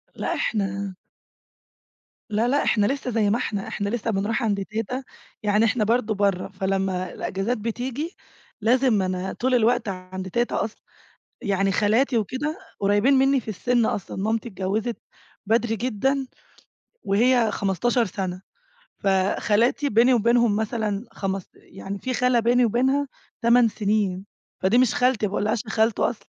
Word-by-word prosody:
لأ - - -2
إحنا 195 -2 -2 1.3
لا 220 +3 +1
لأ، 285 +3 +2
إحنا 210 -3 +2
لسّه 265 +1 -1
زي 215 -2 +2
ما 225 - +2
إحنا. 205 -5 -3
إحنا 200 0 -3
لسّه 230 0 -2
بنروح 215 +5 -1
عند 200 -3 0
تيتة 225 +5 -4 0.4
يعني 210 +1 +3
إحنا 225 0 +1
برضه 225 0 +1
برّا 200 -3 0
فلمّا 190 -1 -2
الأجازات 200 +6 -2
بتيجي 250 - -4 0.5
لازم 245 -1 +3
أنا 185 0 -2
طول 255 +1 +1
الوقت 240 -1 +2
عند 185 0 -6
تيتة 240 +5 0
أصلًا، 220 - -7 0.6
يعني 195 -3 +1
خالاتي 225 +6 +2
وكده 260 +8 -2 0.2
قريبين 205 +7 +3
مني 270 0 +4
في 230 - -15
السن 235 +3 +1
أصلًا، 200 - -3
مامتي 220 +4 -1
اتجوزت 205 +5 -2 0.5
بدري 225 +1 +1
جدًا 255 +4 -1 0.8
وهي 230 +3 +3
15 230 +6 +1
سنة 185 -1 -4 0.6
فخالاتي 205 +7 +1
بيني 245 +2 +4
وبينهم 235 -1 +3
مثلًا 220 -1 -2
خمست 195 -1 -4
يعني 195 +1 -8
في 255 +3 -3
خالة 250 -1 +3
بيني 245 +2 +3
وبينها 265 +5 +1 0.3
8 235 0 +5
سنين، 205 -3 -1 0.3
فدي 195 +6 +3
مش 250 -2 +3
خالتي 250 -4 +2
ما - - -4
باقولهاش 210 +1 0
يا - - -7
خالتو 220 0 +1
أصلًا. - - -3
220 Hz, 145 wpm, -24 LUFS, 200-245 Hz, 1.3 s, 8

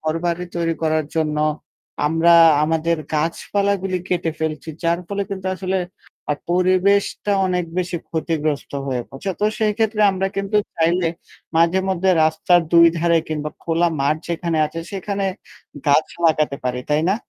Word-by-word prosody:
ঘরবাড়ি 165 +2 -2
তৈরি 165 -1 0
করার 155 -1 +1
জন্য 155 -1 0 0.7
আমরা 165 +2 +4 0.3
আমাদের 165 +1 0 0.2
গাছপালাগুলি 190 +4 -1
কেটে 175 -2 0
ফেলছি। 160 0 -3
যার 170 +1 +1
ফলে 200 0 -2
কিন্তু 190 -1 -5
আসলে 190 0 -2 0.6
আ - - 0 0.2
পরিবেশটা 185 +3 +2
অনেক 180 -1 0
বেশি 180 -1 -2
ক্ষতিগ্রস্ত 155 -2 -2
হয়ে 130 -3 -2
পড়ছে। 135 +9 -5
তো - - +2
সেইক্ষেত্রে 220 0 0
আমরা 190 +1 -1
কিন্তু 195 +2 -1 0.2
চাইলে 170 +1 +2 0.5
মাঝেমধ্যে 185 +2 +2
রাস্তার 160 +3 +3
২ 170 0 +8
ধারে 170 0 +3
কিংবা 150 -1 -3
খোলা 170 +1 +1
মাঠ 140 +3 +2
যেখানে 170 -1 -2
আছে 165 +2 -6
সেখানে 195 +1 -3 0.6
গাছ 145 +2 +4 0.2
লাগাতে 155 -3 +2
পারি। 125 0 -1
তাই 150 +1 +2
না? 195 - +3
170 Hz, 140 wpm, -20 LUFS, 160-190 Hz, 0.7 s, ২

